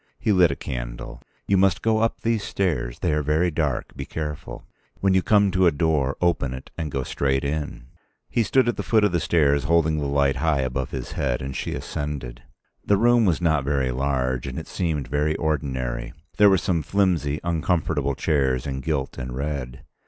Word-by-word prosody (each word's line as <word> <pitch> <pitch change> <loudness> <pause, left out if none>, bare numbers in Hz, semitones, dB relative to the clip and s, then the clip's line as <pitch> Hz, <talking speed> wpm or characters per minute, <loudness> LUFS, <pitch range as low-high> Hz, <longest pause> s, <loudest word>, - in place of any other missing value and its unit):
He 110 - 0
lit 90 -4 +5
a 70 - -2
candle. - - -6 0.2
"You 100 - +2
must 95 -1 +2
go 110 -1 +2
up 115 +1 0
these 115 -2 +1
stairs. 75 -11 -1
They 85 - +1
are 75 - +1
very 80 +4 +1
dark; 75 -5 -2
be - - -5
careful. 75 -2 -6 0.3
When 95 -1 +2
you 95 - +4
come 100 0 +3
to 95 0 +3
a - - +5
door, 70 -2 0
open 80 -7 +1
it 65 - -11
and 80 -2 -3
go 70 -2 -2
straight 70 +1 0
in." 70 -3 -3 0.4
He 120 - 0
stood 130 +3 +3
at 120 - 0
the - - -1
foot 110 -2 +2
of 105 - +3
the 85 - +1
stairs 70 -4 +2
holding 80 -1 +2
the 70 - -1
light 70 -1 +2
high 80 -4 +1
above 65 0 -2
his 65 -2 -5
head 65 -4 -1
and 65 0 -5
she - - -3
ascended. 65 -4 -5 0.4
The 100 - +3
room 120 +1 +4
was 90 -3 +1
not 80 -4 +2
very 70 -2 0
large, 65 -1 -1
and - - -5
it - - -5
seemed 80 -6 -2
very 75 +3 0
ordinary. 65 -6 -2 0.2
There 105 +1 +7
were 95 - +5
some 85 -1 0
flimsy, 80 -5 +1
uncomfortable 80 -4 0
chairs 65 -4 +1
in 65 -1 -3
gilt 70 -1 -2
and 60 0 -5
red. 70 -3 -4
75 Hz, 200 wpm, -24 LUFS, 65-90 Hz, 0.4 s, There